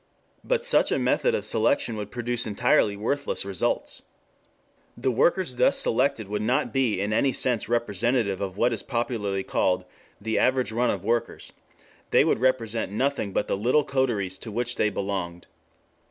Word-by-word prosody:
But - - 0
such - - +3
a - - +2
method 480 -1 +1
of - - -2
selection 280 - +2
would 105 -1 -5
produce 120 0 -2
entirely 105 -1 +2
worthless 140 +2 -1
results. 100 -3 -2 1.0
The 130 +2 0
workers 135 +2 +1
thus - - +3
selected 125 -3 +1
would 105 +1 -3
not 125 +7 0
be 130 -8 +1
in 105 +2 -1
any 130 +5 +2
sense 125 -4 0
representative 115 -2 0
of 95 -1 -4
what 120 +2 +2
is 110 - -3
popularly 105 -5 -2
called 90 -1 0 0.3
'the 110 +2 -1
average 130 -2 +2
run 120 +2 +1
of 95 - -2
workers;' 115 +2 -2 0.6
they - - +4
would - - +1
represent 115 -5 0
nothing 130 -1 -1
but 100 - -1
the - - 0
little 125 +9 +2
coteries 110 -10 -1
to 110 - -7
which 120 +2 -2
they 105 - +1
belonged. 95 -4 -4
115 Hz, 165 wpm, -25 LUFS, 100-130 Hz, 1.0 s, they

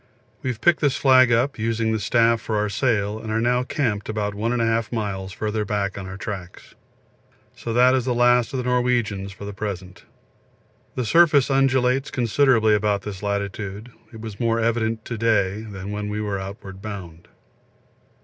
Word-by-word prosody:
We 130 - -2
have 120 -3 -4
picked 175 -1 +4
this 145 -3 +2
flag 130 -2 +5
up, 120 +3 +1
using 115 0 0
the 110 - 0
staff 115 +2 +2
for 110 - -3
our 105 0 0
sail, 105 -1 0
and 110 -1 -6
are 110 - +1
now 125 +2 +2
camped 115 -6 -2
about 105 -1 -2
1 110 +3 -2
1/2 115 -2 0
miles 100 -4 -3
further 110 +2 -2
back 100 -1 -2
on 95 -1 -6
our 95 0 -7
tracks. 95 -4 -7 0.8
So 115 - -5
that 125 +2 +5
is 130 -2 +1
the 125 -2 0
last 120 -1 +3
of 135 - -3
the 125 - -2
Norwegians 120 -6 0
for 100 +1 -10
the 100 - -6
present. 95 -3 -6 0.9
The 125 - -1
surface 150 0 +4
undulates 135 0 +2
considerably 120 -2 +3
about 105 -1 +1
this 100 -3 -7
latitude; 100 +2 -4 0.2
it 110 - -11
was 110 -2 -8
more 115 -1 +1
evident 115 -1 0
to 115 -2 -5
day 105 -3 +1
than 100 -2 -7
when 105 0 -4
we 105 +1 -3
were 100 -2 -2
outward 95 0 -8
bound. 90 -6 -8
110 Hz, 180 wpm, -23 LUFS, 100-120 Hz, 0.9 s, flag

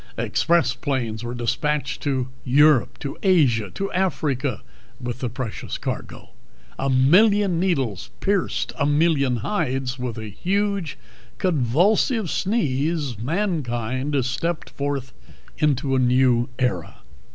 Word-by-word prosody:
Express 165 -8 +2
planes 120 -4 -2
were 120 +1 -4
dispatched 130 +3 -1
to 130 -3 -1
Europe, 145 0 +4
to 140 - -6
Asia, 135 - +3
to 195 0 -3
Africa 150 - -1 0.4
with 120 -1 -5
the 125 - -2
precious 120 -2 -5
cargo, - - -6 0.5
a 135 - 0
million 180 +8 +4
needles 135 - -1
pierced 200 -2 0
a 145 - +2
million 145 -4 +2
hides, 135 -9 -1
and 125 - -3
with 120 - -5
a 110 -1 -6
huge, 200 - -1 0.4
convulsive 185 - +2
sneeze 150 - 0
mankind 135 - -1
stepped 155 +5 -2
forth 140 -2 -3 0.5
into 140 -3 +1
a - - +3
new 125 -1 +3
era. 120 -11 -2
140 Hz, 120 wpm, -23 LUFS, 125-170 Hz, 0.5 s, Europe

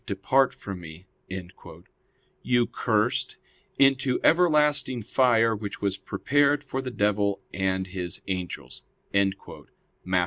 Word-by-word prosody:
'Depart 130 +7 +2
from 95 -2 -8
Me'], 85 +1 -11 1.4
you 120 -1 +2
cursed, - - -1 0.4
into 135 -1 +3
everlasting 150 -7 +3
fire, 115 -1 +3
which 105 -1 -6
was 100 -2 0
prepared 145 +8 +1
for 135 -2 -4
the 130 - -5
devil 100 -3 0
and 95 -1 0
his 90 -2 -5
angels" 90 -2 -5 0.3
(Matt. 100 -1 +2
110 Hz, 105 wpm, -26 LUFS, 95-135 Hz, 1.4 s, into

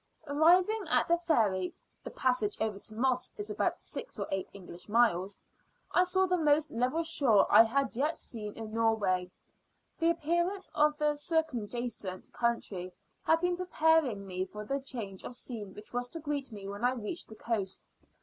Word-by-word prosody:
Arriving 355 +9 +4
at - - +3
the 340 0 +3
ferry 210 - +1 0.3
(the - - -6
passage 250 -5 0
over 215 -3 -1
to 215 - -8
Moss 255 +2 0
is 415 -1 -4
about - - -1
six - - -6
or - - -2
eight 195 -1 -2
English 180 -1 -11
miles) 205 -4 +2 0.5
I 360 - +4
saw 375 +1 +2
the 360 -1 +1
most 300 -1 +3
level 255 +8 0
shore 270 -10 +4
I - - +10
had 255 +3 +1
yet 295 +6 0
seen 210 -3 -6
in 220 -1 -7
Norway. 205 -5 +1 0.7
The 330 0 +3
appearance 345 +4 0
of 300 0 +3
the 300 0 +2
circumjacent 240 - -3
country 205 -6 -1 0.3
had 325 0 +3
been 355 0 +1
preparing 320 - +2
me 185 -1 -2
for 210 +2 -8
the 275 +5 -1
change 230 -8 -6
of 250 - -7
scene 215 -6 -5
which 210 +2 -12
was 245 0 -1
to 330 - -5
greet 290 -4 -3
me 200 -2 -8
when 200 +3 -6
I 250 +1 +3
reached 240 +6 -5
the 220 - -11
coast. 205 -5 -3
245 Hz, 175 wpm, -31 LUFS, 210-320 Hz, 0.7 s, I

